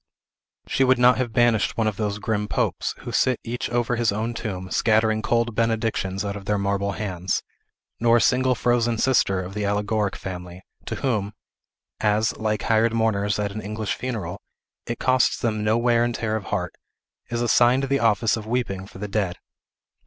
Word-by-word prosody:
She 135 Hz, -, +2 dB
would 130 Hz, -1 st, +4 dB
not 125 Hz, +1 st, +5 dB
have 125 Hz, -3 st, -1 dB
banished 115 Hz, -1 st, +2 dB
one 115 Hz, -, +1 dB
of 110 Hz, -2 st, -1 dB
those 105 Hz, -2 st, -1 dB
grim 105 Hz, 0 st, -2 dB
popes, -, -, -1 dB
who -, -, -6 dB
sit 130 Hz, -2 st, +2 dB
each 120 Hz, +2 st, -4 dB
over 120 Hz, 0 st, 0 dB
his 115 Hz, -2 st, +2 dB
own 110 Hz, +3 st, -2 dB
tomb, 95 Hz, -5 st, -5 dB
scattering 110 Hz, 0 st, +2 dB
cold 115 Hz, +1 st, +1 dB
benedictions 110 Hz, -4 st, -1 dB
out 100 Hz, 0 st, -3 dB
of 100 Hz, -1 st, -8 dB
their 105 Hz, +1 st, +1 dB
marble 100 Hz, 0 st, -1 dB
hands; 95 Hz, -3 st, -2 dB, 0.6 s
nor 115 Hz, 0 st, +4 dB
a -, -, +2 dB
single 130 Hz, 0 st, +3 dB
frozen 120 Hz, -1 st, +1 dB
sister 110 Hz, -6 st, +2 dB
of 90 Hz, +2 st, -8 dB
the 105 Hz, 0 st, -3 dB
Allegoric 105 Hz, 0 st, 0 dB
family, 90 Hz, 0 st, -7 dB, 0.2 s
to -, -, -2 dB
whom 105 Hz, -6 st, -1 dB, 0.7 s
as, 105 Hz, +1 st, +1 dB
like 110 Hz, -1 st, -1 dB
hired 115 Hz, 0 st, +2 dB
mourners 105 Hz, -3 st, +1 dB
at 105 Hz, -1 st, -1 dB
an 110 Hz, +2 st, -5 dB
English 110 Hz, 0 st, -3 dB
funeral, 105 Hz, -7 st, -4 dB, 0.5 s
it 120 Hz, -, -3 dB
costs 130 Hz, -1 st, +2 dB
them 110 Hz, -2 st, -1 dB
no 110 Hz, +2 st, +2 dB
wear 120 Hz, 0 st, +3 dB
and 120 Hz, -1 st, -1 dB
tear 110 Hz, -1 st, -1 dB
of 110 Hz, -, -4 dB
heart -, -, -2 dB, 0.6 s
is 120 Hz, 0 st, -1 dB
assigned 120 Hz, +3 st, +4 dB
the 135 Hz, 0 st, +1 dB
office 115 Hz, 0 st, +2 dB
of 110 Hz, -2 st, -7 dB
weeping 110 Hz, -6 st, -2 dB
for -, -, -13 dB
the 105 Hz, +2 st, -4 dB
dead. 100 Hz, -3 st, -1 dB
110 Hz, 185 wpm, -24 LUFS, 100-120 Hz, 0.7 s, not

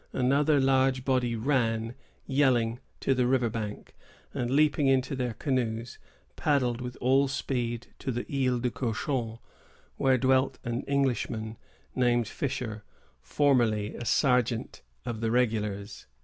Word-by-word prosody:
Another 140 Hz, +3 st, +3 dB
large 130 Hz, -1 st, +2 dB
body 125 Hz, -3 st, +1 dB
ran, 115 Hz, -2 st, 0 dB, 0.3 s
yelling, 125 Hz, -4 st, +2 dB, 0.2 s
to 135 Hz, -, +2 dB
the 125 Hz, -1 st, +1 dB
river 125 Hz, -3 st, +2 dB
bank, 105 Hz, -2 st, -6 dB, 0.4 s
and, 120 Hz, -, -2 dB
leaping 145 Hz, +1 st, +3 dB
into 135 Hz, 0 st, +2 dB
their 125 Hz, -3 st, -2 dB
canoes, 120 Hz, -4 st, -2 dB, 0.4 s
paddled 125 Hz, -5 st, +1 dB
with 125 Hz, 0 st, -6 dB
all 135 Hz, +2 st, +3 dB
speed 120 Hz, -3 st, -2 dB
to 130 Hz, -, -3 dB
the 120 Hz, 0 st, -3 dB
Isle 130 Hz, -3 st, 0 dB
au -, -, +3 dB
Cochon, 115 Hz, -1 st, -2 dB, 0.6 s
where 130 Hz, -1 st, +3 dB
dwelt 130 Hz, +1 st, +2 dB
an 120 Hz, +1 st, -2 dB
Englishman, 120 Hz, -5 st, -1 dB, 0.4 s
named 120 Hz, -3 st, +2 dB
Fisher, 115 Hz, -5 st, -4 dB, 0.4 s
formerly 120 Hz, -8 st, +1 dB
a -, -, -6 dB
sergeant 125 Hz, -3 st, +1 dB, 0.2 s
of 115 Hz, -2 st, -4 dB
the 115 Hz, -, 0 dB
regulars. 105 Hz, -4 st, -1 dB
125 Hz, 130 wpm, -28 LUFS, 115-135 Hz, 0.6 s, Another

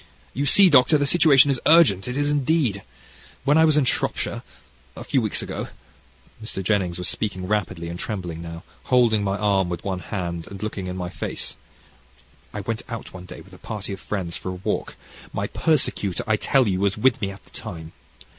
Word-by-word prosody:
You 140 Hz, +3 st, -1 dB
see, 195 Hz, +7 st, +7 dB
Doctor, 145 Hz, -1 st, +5 dB
the 145 Hz, -, +1 dB
situation 145 Hz, -3 st, +6 dB
is 130 Hz, -, -1 dB
urgent, 150 Hz, -, +5 dB
it 125 Hz, +2 st, -3 dB
is 145 Hz, 0 st, +1 dB
indeed. 140 Hz, -7 st, +1 dB, 0.6 s
When 145 Hz, +1 st, +4 dB
I 160 Hz, 0 st, +6 dB
was 155 Hz, -2 st, +4 dB
in 145 Hz, -, +3 dB
Shropshire, -, -, -1 dB, 0.6 s
a -, -, -6 dB
few -, -, +1 dB
weeks -, -, -1 dB
ago" -, -, -5 dB, 0.8 s
(Mr. 95 Hz, -3 st, -5 dB
Jennings 95 Hz, -3 st, 0 dB
was 90 Hz, -, -4 dB
speaking 95 Hz, -4 st, -2 dB
rapidly 95 Hz, -4 st, -2 dB
and 85 Hz, +1 st, -6 dB
trembling 90 Hz, -6 st, -5 dB
now, 85 Hz, +1 st, -8 dB, 0.2 s
holding 120 Hz, -5 st, +3 dB
my 100 Hz, 0 st, -1 dB
arm 100 Hz, -3 st, +1 dB
with 85 Hz, -, -5 dB
one 95 Hz, -2 st, -2 dB
hand, 85 Hz, -3 st, -5 dB
and 100 Hz, 0 st, -8 dB
looking 100 Hz, -3 st, -4 dB
in 90 Hz, 0 st, -5 dB
my 90 Hz, -1 st, -4 dB
face), -, -, -4 dB, 1.0 s
"I 105 Hz, -, -5 dB
went 115 Hz, +3 st, -3 dB
out 115 Hz, -3 st, -7 dB
one 90 Hz, -1 st, -9 dB
day -, -, -10 dB
with -, -, -17 dB
a -, -, -13 dB
party 100 Hz, -2 st, -5 dB
of 95 Hz, -, -7 dB
friends 95 Hz, -6 st, -4 dB
for -, -, -5 dB
a -, -, -3 dB
walk: -, -, -2 dB, 0.4 s
my -, -, -2 dB
persecutor, 125 Hz, -, 0 dB
I 110 Hz, -, +2 dB
tell 130 Hz, +3 st, +2 dB
you, 95 Hz, -2 st, 0 dB
was 100 Hz, +3 st, +1 dB
with 120 Hz, +2 st, +2 dB
me 100 Hz, -, -1 dB
at 100 Hz, 0 st, -11 dB
the -, -, -23 dB
time. 80 Hz, -1 st, -8 dB
105 Hz, 200 wpm, -23 LUFS, 90-130 Hz, 1.0 s, see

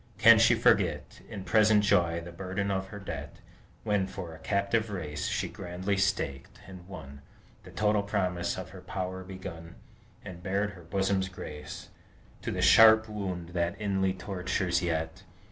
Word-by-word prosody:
Can -, -, +8 dB
she -, -, +6 dB
forget, -, -, +1 dB
In 100 Hz, -3 st, -6 dB
present 110 Hz, 0 st, +4 dB
joy, 85 Hz, -4 st, +2 dB
the 85 Hz, +1 st, -9 dB
burden 95 Hz, +3 st, -3 dB
of 95 Hz, 0 st, -2 dB
her 105 Hz, -, -9 dB
debt, 95 Hz, -, -7 dB, 0.5 s
When 105 Hz, -3 st, +1 dB
for 90 Hz, -4 st, -7 dB
a 80 Hz, -, -12 dB
captive 100 Hz, +5 st, 0 dB
race 75 Hz, -7 st, -4 dB
She -, -, -1 dB
grandly 90 Hz, +3 st, -3 dB
staked, 95 Hz, -9 st, -1 dB
and 90 Hz, -2 st, -12 dB
won, 70 Hz, -7 st, -10 dB, 0.4 s
The -, -, -11 dB
total 105 Hz, -1 st, +1 dB
promise 90 Hz, -4 st, -1 dB
of -, -, -6 dB
her -, -, -11 dB
power 95 Hz, 0 st, -4 dB
begun, 90 Hz, -3 st, -9 dB, 0.5 s
And 90 Hz, -3 st, -8 dB
bared 100 Hz, +3 st, -1 dB
her 95 Hz, -, -13 dB
bosom's 95 Hz, +2 st, 0 dB
grace 75 Hz, -4 st, -8 dB, 0.5 s
To -, -, -4 dB
the -, -, -1 dB
sharp 110 Hz, 0 st, +7 dB
wound 95 Hz, -5 st, -4 dB
that 85 Hz, +1 st, -2 dB
inly 95 Hz, -2 st, 0 dB
tortures 90 Hz, -1 st, -1 dB
yet? 80 Hz, -2 st, -2 dB
95 Hz, 160 wpm, -29 LUFS, 85-100 Hz, 0.5 s, Can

